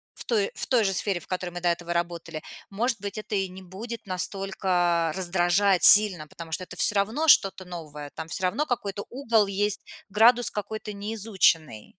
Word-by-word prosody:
в - - -8
той 210 -4 0
в - - -2
той 245 -4 +3
же 195 -1 0
сфере, 190 -1 -1
в - - -14
которой 180 -1 -4
мы 175 0 -7
до 175 - 0
этого 170 0 -2
работали, 170 -2 -4 0.3
может 230 +2 -1
быть, 200 +1 -5
это 210 0 -5
и 195 -1 0
не 185 +1 -11
будет 210 +4 -8
настолько 180 -3 -1
раздражать 180 0 +1
сильно, 190 -7 +7
потому 165 +1 -11
что 185 - -3
это - - -11
всё 210 - +1
равно 225 +11 0
что-то 195 -8 +4
новое, 150 -5 -9
там 160 0 -6
всё 185 +3 -2
равно 255 +12 0
какой-то 205 -6 -4
угол 230 -5 +1
есть, 200 +1 -1 0.3
градус 235 +4 +4
какой-то 210 +1 -6
неизученный. 200 - 0
195 Hz, 185 wpm, -25 LUFS, 175-210 Hz, 0.3 s, сильно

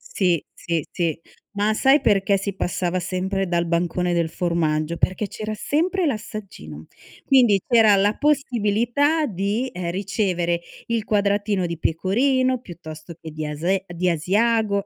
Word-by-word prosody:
Si. 175 -5 0
Sì, 165 -3 -2
sì. 165 -3 -2 0.3
Ma 210 +1 +1
sai 270 +6 +4
perché 200 -1 +2
si 195 0 -4
passava 180 0 -1
sempre 190 +2 -2
dal 170 -1 0
bancone 175 +1 0
del 170 -1 +1
formaggio? 165 -2 -1
Perché 190 +4 -1
c'era 215 0 -5
sempre 345 - 0
l'assaggino; 195 - -6 0.4
quindi 240 -7 +4
c'era 225 -4 +5
la 205 +2 +2
possibilità 275 +2 +1
di, 205 +6 -1
ehm, 175 -1 -4
ricevere 185 -3 -1 0.3
il 230 -2 -1
quadratino 205 -2 +1
di 170 -1 -5
pecorino, 255 - +1
piuttosto 165 -5 -10
che 160 - -8
di 155 0 -4
ase 175 +6 -1
di 175 +1 -1
asiago, 200 +5 +1
195 Hz, 135 wpm, -22 LUFS, 170-220 Hz, 0.4 s, c'era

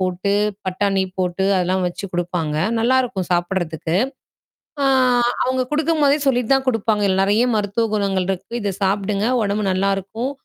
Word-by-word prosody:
போட்டு, 185 +2 -1 0.3
பட்டாணி 195 +1 0 0.2
போட்டு 185 +1 -1
அதெல்லாம் 185 +1 0
வச்சு 175 +3 -5
குடுப்பாங்க, 175 -3 -2 0.2
நல்லாயிருக்கும் 245 -5 +1
சாப்பிடறதுக்கு. 175 -2 -1 0.9
ஆ - - +2 0.6
அவுங்க 255 0 0
குடுக்கும் 310 0 +1
போதே 285 +2 +4
சொல்லிட்டு 250 -1 +2
தான் 265 0 -2
குடுப்பாங்க. 220 -3 +1
இதுல 190 0 +2
நெறைய 210 +5 +3
மருத்துவ 210 +2 0
குணங்கள் 195 -3 0
இருக்கு. 190 +3 -4
இத 200 -2 -2
சாப்பிடுங்க 200 +1 0 0.2
ஒடம்பு 205 +1 -1
நல்லாருக்கும். 195 +6 -1
200 Hz, 140 wpm, -20 LUFS, 185-230 Hz, 0.9 s, போதே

